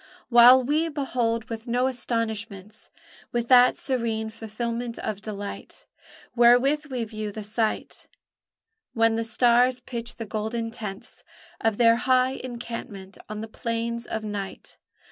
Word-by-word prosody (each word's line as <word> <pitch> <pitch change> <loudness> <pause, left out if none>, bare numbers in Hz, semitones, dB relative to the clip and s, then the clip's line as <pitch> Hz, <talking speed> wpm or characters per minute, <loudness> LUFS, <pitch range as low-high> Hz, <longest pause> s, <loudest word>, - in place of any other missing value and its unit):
While 245 +2 +8
we 305 +5 +1
behold 245 -6 -1
with 225 +1 -7
no 245 +2 +1
astonishments, 220 -4 -3 0.4
With 240 -1 -2
that 250 -1 +6
serene 230 -4 -2
fulfilment 230 +2 -4
of 205 -2 -4
delight 205 -2 -7 0.5
Wherewith 255 +5 +4
we 255 -4 -3
view 215 -1 -5
the 215 +1 -7
sight 215 +1 -2 0.9
When 225 -1 +3
the 230 - 0
stars 245 +2 +3
pitch 240 -1 -6
the 225 - -6
golden 220 +2 -3
tents 210 -3 -7 0.4
Of 225 -2 0
their 230 -1 +5
high 255 +1 +3
encampment 235 -6 -7
on 215 0 -5
the 220 - -5
plains 230 +1 -3
of 220 - -4
night. 205 -2 -6
230 Hz, 130 wpm, -25 LUFS, 220-245 Hz, 0.9 s, While